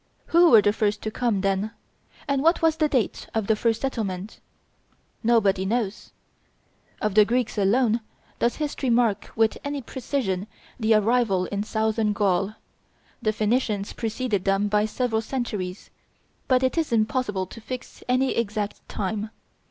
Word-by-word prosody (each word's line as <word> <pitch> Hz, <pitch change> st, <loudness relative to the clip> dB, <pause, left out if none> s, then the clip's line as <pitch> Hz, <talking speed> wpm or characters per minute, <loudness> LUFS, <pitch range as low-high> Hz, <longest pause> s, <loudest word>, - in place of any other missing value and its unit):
Who 340 Hz, 0 st, +7 dB
were 225 Hz, -7 st, +7 dB
the 205 Hz, -, +3 dB
first 210 Hz, -1 st, 0 dB
to 215 Hz, -, -2 dB
come, 230 Hz, -4 st, 0 dB
then? 195 Hz, +3 st, 0 dB, 0.5 s
and 275 Hz, -1 st, +1 dB
what 330 Hz, +3 st, +3 dB
was 320 Hz, -1 st, +3 dB
the 310 Hz, -2 st, +2 dB
date 255 Hz, -7 st, -1 dB
of 220 Hz, -2 st, +1 dB
the 220 Hz, -, +2 dB
first 225 Hz, +1 st, 0 dB
settlement? 210 Hz, -7 st, -3 dB, 0.8 s
Nobody 210 Hz, -5 st, +3 dB
knows. 215 Hz, 0 st, -2 dB, 0.9 s
Of 215 Hz, -2 st, -1 dB
the 215 Hz, +1 st, +7 dB
Greeks 240 Hz, +2 st, 0 dB
alone 225 Hz, +3 st, +2 dB, 0.4 s
does 235 Hz, -, +1 dB
history 290 Hz, -3 st, -2 dB
mark 230 Hz, -4 st, +2 dB
with 220 Hz, 0 st, +2 dB
any 285 Hz, 0 st, -3 dB
precision 220 Hz, -7 st, -2 dB, 0.3 s
the 220 Hz, -1 st, +3 dB
arrival 215 Hz, -3 st, +2 dB
in 200 Hz, +2 st, -3 dB
southern 220 Hz, 0 st, 0 dB
Gaul. 200 Hz, 0 st, +1 dB, 0.7 s
The 215 Hz, -2 st, +1 dB
Phoenicians 215 Hz, -2 st, 0 dB
preceded 225 Hz, -3 st, -2 dB
them 195 Hz, +1 st, +1 dB
by 210 Hz, +1 st, +2 dB
several 220 Hz, 0 st, -1 dB
centuries; 215 Hz, -6 st, -4 dB, 0.6 s
but 255 Hz, -1 st, +3 dB
it 260 Hz, +6 st, +1 dB
is 320 Hz, -, -1 dB
impossible 215 Hz, -3 st, 0 dB
to 230 Hz, +5 st, -12 dB
fix 255 Hz, +2 st, -8 dB
any 255 Hz, +1 st, +2 dB
exact 210 Hz, -2 st, -2 dB
time. 210 Hz, +1 st, -3 dB
220 Hz, 150 wpm, -25 LUFS, 205-250 Hz, 0.9 s, Who